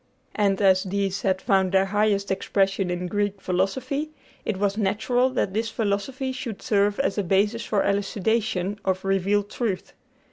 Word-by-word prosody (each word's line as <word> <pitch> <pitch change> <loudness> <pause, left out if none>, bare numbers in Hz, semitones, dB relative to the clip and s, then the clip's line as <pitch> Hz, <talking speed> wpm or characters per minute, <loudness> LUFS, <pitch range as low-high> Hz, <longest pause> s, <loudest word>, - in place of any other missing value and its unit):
And 200 -2 +1
as 190 -1 +5
these 195 0 -2
had 190 -1 +1
found 190 -1 +2
their 190 0 +4
highest 200 0 +1
expression 195 0 0
in 180 0 -2
Greek 205 +1 -1
philosophy, 195 +12 -1 0.4
it 210 - -1
was 200 0 0
natural 220 +5 +1
that 200 -7 -1
this 225 +1 -1
philosophy 225 +6 -2
should 255 -5 -5
serve 205 -1 +2
as 210 -6 0
a - - +1
basis 205 +5 +1
for 205 -2 +1
the - - +1
elucidation 205 -1 0
of 190 0 -1
revealed 200 +2 +1
truth. 205 -7 -3
200 Hz, 165 wpm, -25 LUFS, 195-215 Hz, 0.4 s, as